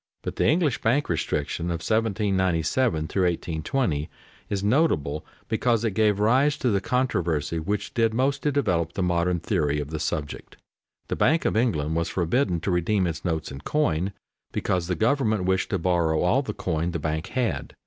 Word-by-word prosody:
But - - -5
the - - +2
English 155 -5 +2
bank 130 +7 +1
restriction 85 0 -1
of 85 -2 -2
1797 105 0 +1
1820 85 - -1 0.4
is 100 -1 -2
notable 100 - +1 0.2
because 115 0 +1
it 115 - +1
gave 105 0 +2
rise 130 +7 +3
to 125 - +1
the 100 -1 +1
controversy 85 - 0
which 100 +6 -3
did 115 -2 +2
most 135 +4 0
to 150 - +1
develop 85 - 0
the 95 - -1
modern 90 0 +1
theory 75 -7 0
of 75 +1 -5
the 80 - -3
subject. 75 -1 -4 0.5
The - - -2
Bank 160 +5 +2
of - - +1
England 80 -10 +1
was 85 0 0
forbidden 90 +1 +1
to 95 - -1
redeem 90 +3 +1
its 85 -3 -3
notes 80 -5 -2
in 70 +1 -8
coin 95 - 0 0.4
because 90 -2 -1
the 90 - 0
government 110 -4 +1
wished 95 0 +1
to 100 - 0
borrow 85 -3 +1
all 105 +10 +3
the 110 -7 -5
coin 85 -1 -1
the - - 0
bank 80 +2 -2
had. 125 -3 -2
95 Hz, 175 wpm, -25 LUFS, 80-115 Hz, 0.5 s, rise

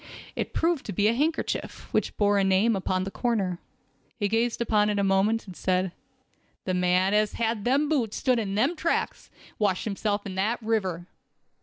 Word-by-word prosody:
It - - -3
proved 330 -3 0
to - - -3
be 205 +4 +2
a 225 - +3
handkerchief, 310 +6 -2
which - - 0
bore 205 -1 +3
a - - +3
name 195 +4 +3
upon 185 -1 -1
the 195 - -5
corner. 195 -8 -1 0.6
He 205 -3 0
gazed 225 +3 0
upon 210 -3 +2
it 205 - 0
a 200 - +1
moment, 195 +4 +2
and 185 -3 -10
said: 185 0 0 0.7
"The 185 - -1
man 180 +2 +2
as 210 0 +2
had 230 0 0
on 205 - -9
them 275 +4 +2
boots 255 -8 0
stood 255 -3 +2
in 200 -3 -2
them 265 +11 +2
tracks, 330 +1 -2 0.2
and - - -24
washed 200 -4 +1
himself 205 0 -2
in 195 - -5
that 205 +6 0
river. 190 -6 -1
210 Hz, 195 wpm, -26 LUFS, 190-230 Hz, 0.7 s, a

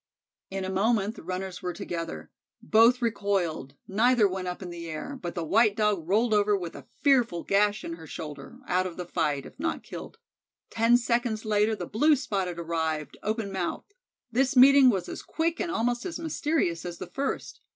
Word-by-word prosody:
In 195 0 -3
a 190 - -3
moment 205 +1 +1
the - - -10
runners 185 +1 -5
were 180 - -3
together. 170 -4 -5 0.3
Both 230 +2 +4
recoiled, 185 - -1
neither 225 +2 +4
went 185 -1 -4
up 180 +2 -5
in 175 - -7
the 170 -1 -7
air, 160 - -5
but 175 -1 -5
the 170 - -2
white 210 +5 +3
Dog 205 -6 0
rolled 220 +3 +3
over 205 -1 +3
with 175 -3 -6
a 140 -2 -11 0.2
fearful 245 - +3
gash 205 +1 +2
in 165 0 -5
her 160 -1 -11
shoulder 150 -4 -8
out 185 +1 +1
of 175 - -9
the 180 - -4
fight, 150 -5 -1
if - - -13
not 330 +2 -2
killed. - - -9 0.5
Ten 230 +2 +4
seconds 235 -2 -1
later 215 +1 +2
the 180 -4 -5
Blue 295 - +3
spot 200 -8 -2
arrived, 160 -3 -3
open 215 -1 -2
mouthed. 190 - -4 0.4
This 265 +4 +1
meeting 270 +1 +8
was 190 -6 0
as - - -6
quick 330 +1 -2
and 345 - -1
almost 240 -3 0
as 335 - -5
mysterious 300 - -1
as 175 -1 -6
the - - -6
first. 275 +9 -4
200 Hz, 190 wpm, -27 LUFS, 175-240 Hz, 0.5 s, meeting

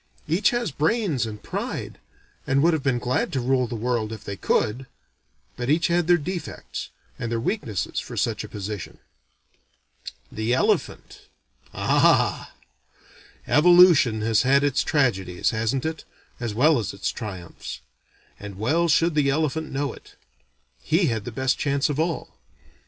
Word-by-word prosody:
Each 170 +7 +3
had 240 - -3
brains 160 - +1
and 105 -1 -8
pride, - - -5 0.5
and 135 +2 +2
would 170 +1 +4
have 160 - 0
been 135 -3 +1
glad 125 +1 -1
to 135 - 0
rule 125 0 +1
the 115 - -5
world 115 -1 -1
if 110 -2 -8
they 100 - -5
could; 120 +6 0 0.7
but 120 +1 -4
each 160 +4 +2
had 170 -1 +1
their 175 0 +5
defects, 175 +1 -6 0.3
and 115 - -3
their 115 - 0
weaknesses 115 - -2
for - - -8
such - - -1
a - - -9
position. 105 -2 -6 1.3
The 110 +3 0
elephant? - - -1 0.4
Ah! - - +2 0.9
Evolution 165 -8 +6
has 110 -1 +3
had 140 +2 +3
its 145 -1 +1
tragedies, 95 - 0
hasn't 115 +4 -1
it, 160 0 -3 0.4
as 115 -4 -4
well 145 +3 +4
as 105 - -4
its - - -2
triumphs; 95 -7 -8 0.6
and 100 -2 -9
well 155 +11 +1
should 165 +1 +3
the 145 -2 +2
elephant 155 +2 -1
know 140 -1 -2
it. - - -16 0.7
He - - +2
had 110 -2 -4
the 120 - -5
best 130 +3 0
chance 140 +1 +1
of 145 - -3
all. 165 -3 -3
130 Hz, 150 wpm, -24 LUFS, 110-155 Hz, 1.3 s, Evolution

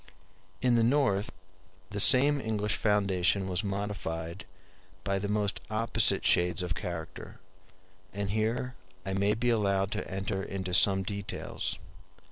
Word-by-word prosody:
] - - -33
In 125 - +4
the 115 -1 +3
North, 115 -6 +1 0.6
the 105 - -3
same 140 +6 +6
English 105 -2 -1
foundation 100 -2 +1
was 90 +1 -1
modified 95 -4 -4 0.6
by 100 0 -1
the 100 - -3
most 105 0 0
opposite 110 -2 +1
shades 90 +1 +2
of 90 -1 -2
character; 85 -2 -7 0.7
and 100 0 -3
here 115 +4 -1 0.3
I 95 - -3
may 100 +2 +1
be 120 +2 +1
allowed 100 -3 +1
to - - -4
enter 95 +1 -3
into 95 -1 -5
some 95 +1 +4
details. 100 +1 -4
100 Hz, 135 wpm, -29 LUFS, 95-110 Hz, 0.7 s, same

